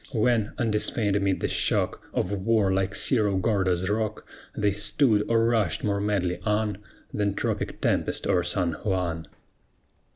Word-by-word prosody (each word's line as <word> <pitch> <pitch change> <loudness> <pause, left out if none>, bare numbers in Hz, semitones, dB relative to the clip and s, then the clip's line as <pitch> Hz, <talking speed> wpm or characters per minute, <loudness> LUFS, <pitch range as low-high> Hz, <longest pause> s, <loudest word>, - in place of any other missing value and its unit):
When, 115 -2 +1
undismayed 105 -2 0
amid 100 -2 0
the - - 0
shock - - 0
Of 90 - -1
war, 100 0 +1
like 95 0 -1
Cerro 105 -6 +2
Gordo's 95 -3 0
rock, 105 +1 -2 0.3
They 105 -1 +2
stood, 105 +2 +2
or 115 0 +3
rushed 110 -7 +1
more 100 -1 0
madly 95 -4 -1
on 105 -1 -1 0.3
Than 100 -1 -1
tropic - - -3
tempest - - 0
o'er 90 - +2
San 90 0 -1
Juan? 85 -5 -2
100 Hz, 140 wpm, -26 LUFS, 95-110 Hz, 0.3 s, or